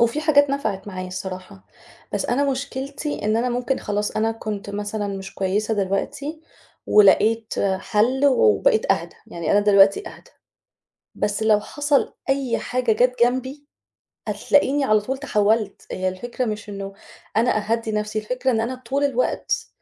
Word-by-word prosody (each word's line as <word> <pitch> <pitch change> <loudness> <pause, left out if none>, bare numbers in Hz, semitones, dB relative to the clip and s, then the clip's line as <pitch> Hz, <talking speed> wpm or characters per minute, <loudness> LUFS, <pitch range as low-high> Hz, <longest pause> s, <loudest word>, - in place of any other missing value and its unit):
وفي 235 +5 +2
حاجات 285 -3 +4
نفِعِت 215 -8 -2
معايا 185 -2 -6
الصراحة، 185 - -7 0.5
بس 205 - -1
أنا 260 +4 +1
مشكلتي 275 +1 -4
إن 215 +1 +2
أنا 245 +2 +1
ممكن 250 +2 -1
خلاص، 205 0 -2
أنا 225 +1 0
كنت 215 -3 -5
مثلًا 205 +1 -3
مش 195 -1 -6
كويسة 205 +3 0
دلوقتي 210 +11 -2 0.5
ولقيت 215 +2 +4 0.2
حَل 240 +8 +1
وبقيت 445 - +3
أهدى، - - -5
يعني 170 -2 -3
أنا 205 - +5
دلوقتي 200 - +4
أهدى. - - -15 0.9
بس 205 +1 -1
لو 215 -1 +4
حصَل 290 +5 0 0.2
أي 270 -3 +1
حاجة 250 -2 -1
جات 250 +3 +2
جنبي 260 +4 -1 0.6
هتلاقيني 285 0 +2
على 215 -4 +4
طول 265 +6 -4
تحوّلت. 215 -5 0
هي 185 0 -1
الفكرة 240 +7 -4
مش 210 -2 -4
إنه 195 -1 -6 0.4
أنا 235 0 +3
أهدّي 230 -1 0
نفسي، 210 0 -2
الفكرة 250 +4 -1
إن 225 - +1
أنا 245 +3 -2
طول 260 +3 -2
الوقت 255 -3 0
225 Hz, 150 wpm, -22 LUFS, 205-265 Hz, 0.9 s, أنا